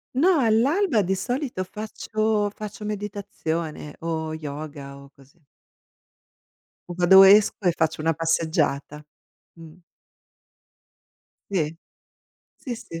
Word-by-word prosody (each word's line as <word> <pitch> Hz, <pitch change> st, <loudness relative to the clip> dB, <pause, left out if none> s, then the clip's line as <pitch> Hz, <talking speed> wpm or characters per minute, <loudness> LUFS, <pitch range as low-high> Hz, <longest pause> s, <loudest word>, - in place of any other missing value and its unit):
No, 335 Hz, +3 st, +4 dB
all'alba 250 Hz, -, +2 dB
di 190 Hz, +1 st, 0 dB
solito 245 Hz, -3 st, -3 dB
faccio 215 Hz, +1 st, -2 dB
faccio 210 Hz, 0 st, -8 dB
meditazione, 195 Hz, -7 st, -5 dB
o 160 Hz, -1 st, -3 dB
yoga 145 Hz, -2 st, -7 dB
o 140 Hz, 0 st, -15 dB
così. 135 Hz, +4 st, -22 dB, 1.5 s
O -, -, -4 dB
vado 190 Hz, +2 st, +7 dB
esco, 205 Hz, +2 st, +6 dB
e 170 Hz, -, +3 dB
faccio 160 Hz, -1 st, 0 dB
una 165 Hz, +1 st, +1 dB
passeggiata. 160 Hz, -2 st, -1 dB, 0.5 s
Mh. 165 Hz, +1 st, -13 dB, 1.7 s
Sì. 160 Hz, -4 st, -1 dB, 0.8 s
Sì, 250 Hz, -3 st, -6 dB
sì. 165 Hz, -7 st, -9 dB
180 Hz, 100 wpm, -24 LUFS, 155-215 Hz, 1.7 s, vado